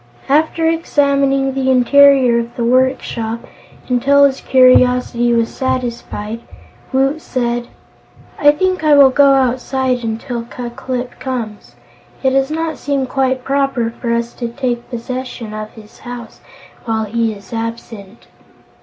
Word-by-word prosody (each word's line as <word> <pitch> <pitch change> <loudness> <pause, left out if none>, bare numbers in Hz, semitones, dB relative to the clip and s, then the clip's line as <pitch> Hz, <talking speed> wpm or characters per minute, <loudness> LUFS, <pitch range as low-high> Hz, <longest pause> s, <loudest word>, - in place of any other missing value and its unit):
After 315 +3 +2
examining 280 -4 +1
the 265 0 -1
interior 260 -1 +5
of 235 0 -6
the 240 - -2
workshop 240 -2 0 0.5
until 270 +3 +3
his 270 -1 +2
curiosity 250 -2 +3
was 230 -1 0
satisfied, 235 -4 -4 0.5
Woot 270 +4 +1
said: 240 -3 -2 0.7
"I 290 - +6
think 370 +3 -1
I 305 -1 +5
will 275 -2 +7
go 280 0 +5
outside 255 -1 0
until 230 +2 -4
Ku 240 0 -7
Klip 250 0 -5
comes. 215 - -6 0.5
It 265 - +3
does 270 +1 +1
not 320 0 -3
seem 280 -2 -1
quite 260 -1 -1
proper 270 -4 0
for 235 0 -4
us 235 0 -1
to 240 - -1
take 240 -1 -4
possession 245 -2 -6
of 215 0 -6
his 215 -1 -15
house 245 -2 -9 0.4
while 220 -1 -1
he 225 +1 -1
is 200 +2 -13
absent." 230 -2 -7
255 Hz, 135 wpm, -16 LUFS, 235-270 Hz, 0.7 s, will